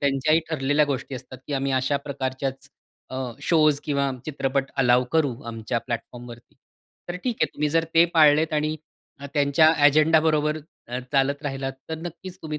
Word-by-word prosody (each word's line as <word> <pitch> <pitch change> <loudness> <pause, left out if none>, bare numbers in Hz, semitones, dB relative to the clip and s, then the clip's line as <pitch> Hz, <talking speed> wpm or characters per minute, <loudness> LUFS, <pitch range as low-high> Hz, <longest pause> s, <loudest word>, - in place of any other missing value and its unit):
त्यांच्याही 140 +3 +2
ठरलेल्या 145 -1 +2
गोष्टी 135 -1 -3
असतात 130 +1 -9
की 145 - -5
आम्ही 135 0 -1
अशा 130 +2 +1
प्रकारच्याच 135 0 -4 0.4
अ, - - -4 0.3
शोज 155 -3 +3
किंवा 140 -2 0 0.2
चित्रपट 135 -2 -1
अलाऊ 125 -1 +4
करू 145 -6 +2
आमच्या 115 +1 -3
प्लॅटफॉर्मवरती. 120 0 -8 0.5
तर 175 - -3
ठीक 245 -3 -1
आहे, - - +4
तुम्ही 150 0 0
जर 165 +2 +1
ते 165 +1 +7
पाळलेत 155 0 +5
आणि 155 +1 0 0.4
अ, 140 - -6
त्यांच्या 145 +2 +4
एजेंडा 155 +2 +5
बरोबर, 155 -1 +1 0.3
अ, 125 +1 -3
चालत 140 +2 +1
राहिलात, 135 -2 -3 0.2
तर 160 - -3
नक्कीच 175 +2 -8
तुम्ही 155 -1 -4
140 Hz, 160 wpm, -24 LUFS, 135-155 Hz, 0.5 s, ते